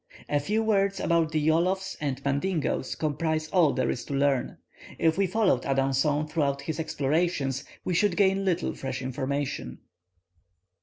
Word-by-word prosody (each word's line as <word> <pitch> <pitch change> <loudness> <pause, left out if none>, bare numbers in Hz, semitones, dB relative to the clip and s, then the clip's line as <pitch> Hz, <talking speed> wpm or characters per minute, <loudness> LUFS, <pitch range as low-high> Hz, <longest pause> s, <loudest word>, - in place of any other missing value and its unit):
A 145 - +1
few 210 +9 0
words 200 -2 +1
about 165 -2 +1
the 155 - +1
Yolofs 185 +4 +1
and 140 -2 -3
Mandingoes 140 -1 -1
comprise 155 +1 -1
all 170 -6 +4
there 130 - 0
is 120 - -4
to 140 - -4
learn. 135 -2 +1 0.4
If 160 -1 +2
we 195 0 +2
followed 185 - +2
Adanson 135 +2 +1
throughout 140 -3 -1
his 160 +3 -4
explorations, 145 -3 0 0.2
we 180 - 0
should 180 0 +2
gain 195 -1 +3
little 180 -3 0
fresh 130 -1 -5
information. 130 - -3
155 Hz, 150 wpm, -27 LUFS, 140-180 Hz, 0.4 s, all